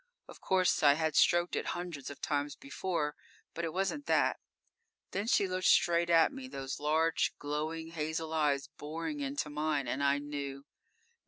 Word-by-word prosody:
Of - - -13
course 185 -1 +2
I 145 -1 +7
had 160 -1 -1
stroked 175 0 +4
it - - -2
hundreds 170 -7 -6
of 145 - -9
times 145 -1 -1
before, 150 +1 -3 0.4
but 170 - -4
it 165 - -1
wasn't 195 - -2
that. - - +2 0.7
Then 200 +3 -2
she 200 -4 +3
looked 185 0 0
straight 170 -2 +4
at 165 - +5
me, 265 -1 -7
those 135 - -5
large, 160 +2 +2
glowing 155 +3 -3
hazel 160 0 -3
eyes 145 -3 +1
boring 165 - -4
into 275 - -3
mine, 150 -3 -1
and 130 +4 -1
I 140 0 +3
knew. 140 -1 -5
160 Hz, 165 wpm, -32 LUFS, 145-175 Hz, 0.7 s, I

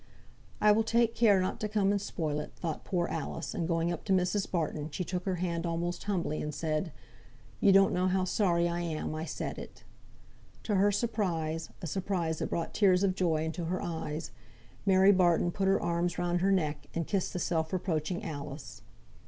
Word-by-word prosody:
"I 210 - +6
will 215 +2 +4
take 230 +1 +2
care 210 -5 +5
not 185 - -1
to 215 - -2
come 205 -2 +2
and 200 -1 0
spoil 155 -6 -2
it," 150 - -7
thought 165 -3 -4
poor 175 -2 0
Alice; 145 -3 -4
and 165 - -2
going 165 0 +1
up 170 - -4
to 195 - -2
Mrs. 185 +2 +1
Barton 155 -3 -2
she 180 +5 -3
took 180 0 -4
her 190 -2 0
hand 170 -1 -2
almost 175 +1 -2
humbly, 175 -7 -1
and 150 -1 -4
said, 155 +2 -1 0.7
"You 200 - +5
don't 195 0 +6
know 180 +1 +2
how 185 0 +2
sorry 175 -3 +2
I 170 0 -2
am 165 -3 -3
I 155 +1 -3
said - - -4
it." - - -11 0.8
To 215 - -1
her 200 +1 +4
surprise, 170 -8 -1
a - - -2
surprise 175 -2 -1
that - - -2
brought 165 -1 -2
tears 190 -3 +4
of 195 -2 +3
joy 165 -4 +1
into 165 +1 -3
her 180 +3 -1
eyes, 160 -1 -4 0.6
Mary 190 +1 +6
Barton 175 -2 +3
put 195 +2 -1
her 195 - +4
arms 170 0 -1
round 175 0 0
her 195 +2 +3
neck, 150 -6 0
and 165 -1 -1
kissed 195 +1 -1
the - - -2
self 160 -2 -1
reproaching 175 -2 -1
Alice. 145 -2 -7
175 Hz, 200 wpm, -30 LUFS, 160-190 Hz, 0.8 s, I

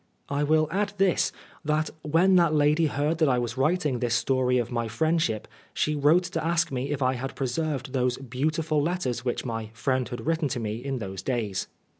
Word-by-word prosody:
I 140 0 0
will 155 +1 +3
add 200 +2 0
this, 195 -2 +2 0.3
that 155 0 0
when 165 +6 +3
that 170 -3 +4
lady 150 +2 +3
heard 150 +3 -1
that 155 -3 +4
I 125 - +3
was 120 0 -2
writing 150 -1 +1
this 120 -1 +1
story 130 -1 +2
of 120 0 -1
my 115 -1 -1
friendship, 155 -2 0 0.3
she 150 - +1
wrote 150 +5 +4
to 175 - -3
ask 165 -1 +1
me 130 +1 -2
if 145 -2 -1
I 130 0 +2
had 130 +1 -5
preserved 135 0 -2
those 125 -1 +1
beautiful 150 +4 -1
letters 145 -7 -1
which 125 +1 -2
my 115 -3 -4
friend 130 +1 -1
had 120 -2 -6
written 165 -2 +1
to 130 -2 -3
me 110 -1 -3
in 135 -1 -2
those 95 -4 -5
days. 110 -6 -2
140 Hz, 200 wpm, -26 LUFS, 125-155 Hz, 0.3 s, that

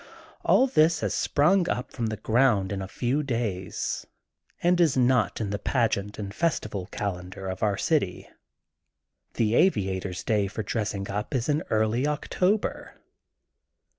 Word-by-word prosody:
All 260 - +5
this 160 - +3
has - - -1
sprung 175 +5 +2
up 125 +2 -2
from 115 -3 -2
the 110 0 -3
ground 110 -5 +2
in 100 -1 -3
a 95 - -5
few 125 +8 -1
days 115 -9 -3 0.6
and 175 0 +4
is 155 -6 +3
not 125 -6 +2
in 105 -3 -2
the 100 - -2
pageant 105 -5 0
and 100 -2 -5
festi 110 -2 -1
val 95 -3 -4
calendar 95 -2 -5
of 95 0 -4
the 105 -2 +1
city. - - 0 1.1
The 110 -1 +1
aviator's 95 - +1
day 105 -3 +1
for 110 +2 -4
dressing 100 -2 -2
up 105 +7 -3
is 125 +2 -1
in 150 +1 +2
early 110 +5 +1
October. 180 +7 -1
110 Hz, 150 wpm, -26 LUFS, 100-140 Hz, 1.1 s, All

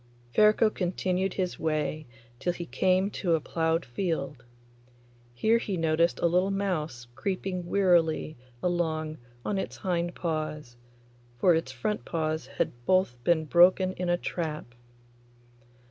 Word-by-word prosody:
Ferko 215 +1 +5
continued 185 0 -1
his 185 -2 -2
way 155 -1 -1 0.3
till 175 +6 0
he 175 0 -6
came 185 +3 +1
to 175 -5 +1
a - - 0
ploughed 165 +1 0
field. 145 -1 -3 0.9
Here 220 - +3
he 200 -5 -3
noticed 165 +1 +2
a - - +2
little 180 +3 +3
mouse 170 -11 -2
creeping 185 +5 -3
wearily 175 -5 +2 0.3
along 160 -3 -1 0.3
on 200 - 0
its - - -5
hind 175 -2 -1
paws, 155 -6 -3 0.6
for 175 +8 +5
its 160 -5 -1
front 130 +12 -2
paws 155 -4 -2
had 140 - -1 0.2
both 185 -11 +2
been 160 +2 +2
broken 185 +3 +5
in 180 -1 -3
a 175 - +3
trap. 155 -8 -4
170 Hz, 130 wpm, -28 LUFS, 155-185 Hz, 0.9 s, Ferko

